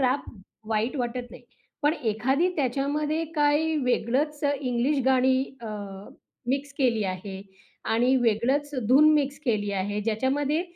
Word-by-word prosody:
Rap 260 +2 +1 0.4
वाईट 225 +5 0
वाटत 245 -1 -3
नाही. 250 - -12 0.4
पण 295 - +4
एखादी 255 +9 +1
त्याच्यामध्ये 295 +4 0
काही 300 +1 +2
वेगळंच 275 +5 0 0.2
इंग्लिश 260 +2 0
गाणी 260 0 +4 0.2
अ, 235 - -7 0.8
मिक्स 280 +2 -1
केली 235 -6 +2
आहे 190 +1 -5 0.5
आणि 245 +4 +3
वेगळंच 250 +5 +1 0.2
धून 285 +5 +7
मिक्स 285 -1 0
केली 210 -5 0
आहे. 200 +2 -2
ज्याच्यामध्ये 270 +8 0
260 Hz, 125 wpm, -26 LUFS, 230-290 Hz, 0.8 s, धून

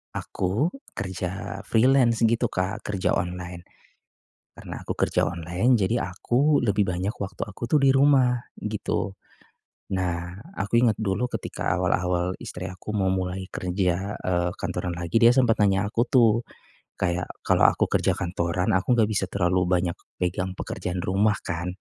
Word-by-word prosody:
aku 105 - -1 0.2
kerja 95 0 -4
freelance 120 0 +4
gitu 115 +2 +3
Kak 95 -1 -2
kerja 100 -3 0
online. 90 0 -3 0.9
Karena - - -8
aku - - -4
kerja - - +1
online, 85 +8 0
jadi 115 +5 +1
aku 130 +11 +1
lebih 105 -3 +2
banyak 95 +4 -2
waktu 100 - -6
aku 105 +3 -6
tuh 145 +4 +2
di 135 - +5
rumah, 135 -2 +4 0.2
gitu. 105 -2 -2 0.8
Nah 90 -1 -2 0.2
aku 115 +5 +2
inget 115 -4 +3
dulu 110 +3 0
ketika - - -2
awal-awal 90 0 0
istri 90 +1 -6
aku 90 +3 -8
mau 100 -2 +1
mulai 95 0 -2
kerja, 95 +2 -1
eee, 90 -1 0
kantoran 90 -1 -3
lagi 85 +5 +1
dia 115 - +9
sempet 125 -3 +3
nanya 100 0 +3
aku 115 +3 0
tuh 115 -2 +4 0.5
kayak, 90 0 -1 0.2
"Kalau - - +4
aku - - +1
kerja - - +2
kantoran, 85 0 -1
aku 95 +7 +2
enggak 110 -2 +3
bisa 100 -2 0
terlalu 90 -1 +1
banyak 90 -1 +1 0.3
pegang 90 +1 -1
pekerjaan 90 -1 -4
rumah 100 +4 +2
kan," 85 +1 -3
95 Hz, 150 wpm, -25 LUFS, 90-115 Hz, 0.9 s, dia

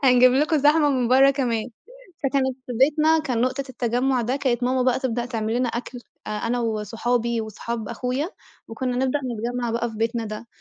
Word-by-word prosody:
هنجيب 250 -1 +6
لكم 305 +4 +2
زحمة 295 +1 +4
من 255 -3 +1
برّا 270 +2 +6
كمان، 245 -4 -1 0.5
فكانت 265 -2 0
في 250 - -5
بيتنا 305 +6 +3
كان 260 -7 -1
نقطة 255 +3 0
التجمع 250 +1 0
ده 245 +4 -1
كانت 255 -4 0
ماما 255 +1 +1
بقى 250 -1 +2
تبدأ 240 -3 -1
تعملنا 235 +1 -1
أكل 245 +2 -5 0.3
آآ، - - -4
أنا 230 +3 -1
وصحابي 230 +2 -1
وصحاب 220 0 -5
أخويا 255 +7 -2 0.4
وكنّا 250 +2 -3
نبدأ 265 +2 +1
نتجمع 240 -2 -3
بقى 235 0 -1
في 220 - -10
بيتنا 230 +1 -1
ده، 215 +2 -7
245 Hz, 175 wpm, -23 LUFS, 230-265 Hz, 0.5 s, هنجيب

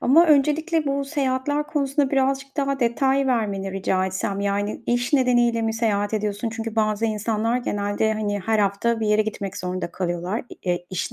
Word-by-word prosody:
ama 320 +7 +5
öncelikle 310 +2 +2
bu 280 0 0
seyahatler 280 +1 -1
konusunda 280 -2 0
birazcık 270 0 0
daha 275 -1 -1
detay 265 +3 +2
vermeni 200 -6 -1
rica 190 -1 0
etsem. 190 +1 -2
Yani 200 +1 -1
iş 240 +2 0
nedeniyle 240 -4 +3
mi 225 0 0
seyahat 210 -2 0
ediyorsun? 210 +1 -2
Çünkü 225 0 -5
bazı 215 0 +1
insanlar 220 +1 0
genelde, 205 -2 0
hani, 205 -1 -2
her 220 +3 0
hafta 210 +3 +1
bir 220 - 0
yere 210 +1 +3
gitmek 200 -2 -5
zorunda 180 -1 -3
kalıyorlar, 180 +4 -2 0.2
eee, 175 -1 -2
iş 185 - -3
225 Hz, 165 wpm, -23 LUFS, 205-270 Hz, 0.2 s, ama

